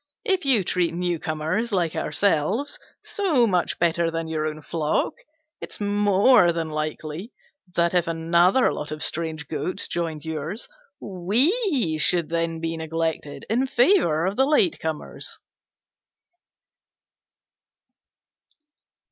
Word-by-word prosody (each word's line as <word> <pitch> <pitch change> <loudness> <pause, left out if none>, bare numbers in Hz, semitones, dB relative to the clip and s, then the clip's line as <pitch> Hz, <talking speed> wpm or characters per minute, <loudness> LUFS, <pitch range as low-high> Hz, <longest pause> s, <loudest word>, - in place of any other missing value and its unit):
If 380 -5 +1
you 250 -8 +4
treat 175 -1 0
newcomers 175 +4 -2
like 175 -5 0
ourselves 200 - 0 0.2
so 330 -12 +1
much 180 -5 0
better 170 0 +1
than 165 0 -4
your 155 -1 -2
own 155 0 -6
flock, 155 -1 -1 0.5
it's - - -6
more 205 0 +4
than 165 -1 -3
likely 155 - -5 0.4
that, 170 0 +2
if 175 -2 +2
another 170 +7 +3
lot 150 - -5
of 155 0 -4
strange 160 -1 -2
goats 180 - -3
joined 160 -3 -3
yours, 160 +7 -4 0.3
we 230 - +1
should 170 0 +3
then 165 0 -1
be 165 0 -3
neglected 160 -2 -3
in 250 +5 +1
favour 245 - +3
of 195 +2 -2
the 265 - +4
last 280 - +2
comers." 160 -1 -4
170 Hz, 115 wpm, -24 LUFS, 160-205 Hz, 0.5 s, you